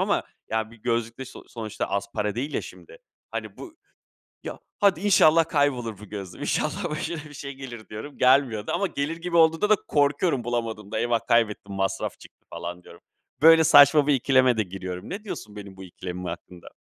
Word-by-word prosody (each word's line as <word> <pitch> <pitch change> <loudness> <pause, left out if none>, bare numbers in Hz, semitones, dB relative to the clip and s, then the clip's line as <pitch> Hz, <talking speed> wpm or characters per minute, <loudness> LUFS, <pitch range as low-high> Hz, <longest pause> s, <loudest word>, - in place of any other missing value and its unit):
ama - - +1 0.3
ya 110 0 -1
bir 115 - -15
gözlük 115 +1 -2
de 130 - -5
so - - -12
sonuçta 110 -2 -5
az 100 0 -2
para 105 -1 -1
değil 140 +5 -4
ya - - -1
şimdi. - - -13 0.3
Hani, - - -6
bu 335 -3 -10 0.7
"Ya, - - -7 0.2
hadi 195 -5 +4
inşallah 165 -5 +5
kaybolur 125 -9 0
bu 105 - -11
gözlüğüm. 95 -3 -8
İnşallah 170 +5 -1
başına 155 +1 -4
bir 145 - -14
şey 140 0 -7
gelir." 120 -5 -9
diyorum. 110 +7 -8
Gelmiyor 125 -5 +3
da - - -2
ama 195 +3 +1
gelir 150 0 -3
gibi 170 0 -3
olduğunda 165 +5 +4
da 215 - +7
korkuyorum 145 -2 +1
bulamadığımda. 110 -3 -3
"Eyvah, 115 0 0
kaybettim 110 -3 +1
masraf 95 0 -2
çıktı!" - - -18
falan 90 +1 -7
diyorum. 85 - -15 0.4
Böyle 165 0 +8
saçma 145 0 +7
bir 145 - +4
ikileme 130 -2 +3
de 110 - +2
giriyorum. 95 -1 -7
Ne 210 +3 -6
diyorsun 105 - -7
benim 100 -2 -9
bu 95 - -10
ikilemim 90 0 -7
hakkında? 85 0 -8
120 Hz, 190 wpm, -25 LUFS, 105-150 Hz, 0.7 s, Böyle